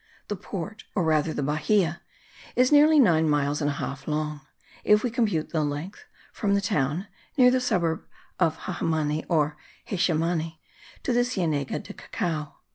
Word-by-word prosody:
The 205 - -1
port, 200 +2 -6
or 185 - +2
rather 155 -1 +2
the 145 - -2
bahia, 170 +4 +1 0.5
is 250 +2 +4
nearly 300 +1 +7
nine 160 - +4
miles 145 0 +1
and 145 - +1
a - - -1
half 140 -1 -5
long, 150 -1 -2 0.4
if 210 0 +4
we 245 - 0
compute 210 - 0
the 160 -3 +1
length 150 - -5 0.3
from 200 -3 +1
the - - +3
town 180 -3 0 0.3
(near 250 -2 +7
the 255 0 +2
suburb 170 -9 0 0.3
of 165 -3 +2
Jehemani 155 -3 -1
or 150 -3 +1 0.3
Xezemani) 165 -3 0 0.5
to 255 - 0
the 245 0 +4
Cienega 165 - -1
of - - -10
Cacao. 155 -4 -3
165 Hz, 160 wpm, -26 LUFS, 150-205 Hz, 0.5 s, nearly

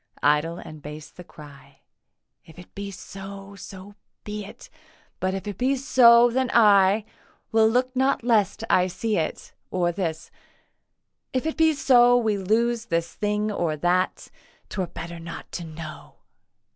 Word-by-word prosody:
Idle 150 +3 +2
and 155 -3 -10
base 150 +1 -9
the 180 - -12
cry 140 -4 -15 0.6
'If 160 - -17
it 180 - -14
be 200 0 -6
so, 195 +1 -10
so 195 +1 -11 0.3
be 210 0 -5
it; 200 - -12 0.5
But 185 0 -1
if 195 +2 -6
it 205 -3 -6
be 260 +2 +2
so, 240 -3 +6
then 260 +1 0
I 205 -2 +5 0.5
Will 220 0 +4
look 255 +3 0
not 265 -1 +1
lest 225 -3 +1
I 180 0 +3
see 205 +4 -2
it.' 160 - -4 0.2
Or 175 -2 0
this, 165 -3 -4 1.0
'If 255 +1 -1
it 320 - -2
be 320 -1 +4
so 245 -3 +5
We 220 -3 +1
lose 230 +4 0
this 170 -3 -2
thing 210 0 -1
or 165 -6 -1
that; 180 +4 0 0.4
'Twere 190 -3 -3
better 170 0 -8
not 165 0 -9
to 175 - -5
know. 160 -1 -10
195 Hz, 155 wpm, -24 LUFS, 170-235 Hz, 1.0 s, so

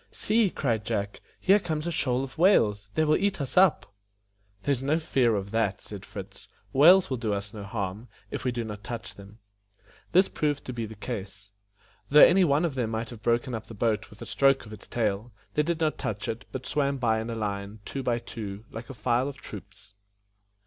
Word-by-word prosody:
"See!" 220 -1 +2
cried 115 -10 -1
Jack, 100 +1 -3 0.2
"here 200 +2 +5
comes 155 -4 -3
a 170 - -1
shoal 130 -4 0
of 135 +3 -8
whales. 105 - +4
They 155 - +3
will 155 0 +4
eat 200 -2 0
us 135 -2 -3
up." 180 - +4 0.7
"There 145 - +1
is 130 -3 0
no 145 +4 +2
fear 130 -8 +2
of 100 0 -3
that," 110 -4 0
said - - -9
Fritz; - - -9 0.3
"whales 170 +5 +7
will 130 - 0
do 110 -3 -1
us 100 +2 -6
no 105 -2 -7
harm, 100 +2 -4 0.2
if - - -4
we 125 - +1
do 120 -1 -3
not 105 -2 -7
touch 115 -1 -6
them." 100 +1 -14 0.7
This 185 +3 +5
proved 145 -2 -1
to 125 - -5
be 115 -2 -3
the 110 - -10
case. 105 -2 -7 0.6
Though 150 +2 +9
any 185 +2 +5
one 150 0 +3
of 165 - -1
them 125 -4 -1
might 115 +1 -3
have 115 -3 -10
broken 120 +2 +1
up 110 -1 -5
the 115 - -10
boat 110 0 0
with 105 - -11
a - - -8
stroke 135 -2 +3
of 110 - -10
its 105 - -11
tail, 110 0 -1 0.2
they 150 - +3
did 165 +2 -1
not 155 -2 0
touch 105 0 -3
it, 115 +1 -4
but 130 -1 -6
swam 140 -1 0
by 115 -3 +1
in 110 - -5
a 115 - -3
line, 100 -1 -3
two 135 - -4
by 120 -2 +1
two, 105 -3 -7
like 115 +1 -8
a 135 - -7
file 125 +2 +1
of 140 -1 -6
troops. 100 -3 -11
120 Hz, 220 wpm, -27 LUFS, 105-140 Hz, 0.7 s, Though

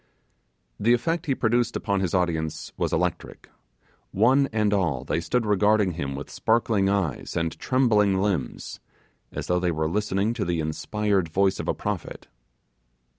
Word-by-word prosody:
The 115 +4 +4
effect 165 +8 -2
he 135 - +1
produced 120 0 +1
upon 100 -2 0
his 95 -1 -1
audience 80 -4 -1
was - - -1
electric; 90 0 -3 0.6
one 130 +7 +3
and 105 -2 +1
all 85 -11 0
they 75 - -1
stood 120 +6 0
regarding 105 -1 +3
him 70 -5 -4
with 70 - -7
sparkling 110 -3 +1
eyes 95 -8 -1
and 80 -1 -1
trembling 105 -7 +2
limbs, 100 -2 -2 0.5
as - - -5
though 90 0 +1
they 90 0 0
were 80 -2 -1
listening 105 +3 0
to - - -2
the 85 -1 -1
inspired 95 +4 -1
voice 95 +3 +1
of - - -4
a - - 0
prophet. - - -5
100 Hz, 155 wpm, -25 LUFS, 85-110 Hz, 0.6 s, The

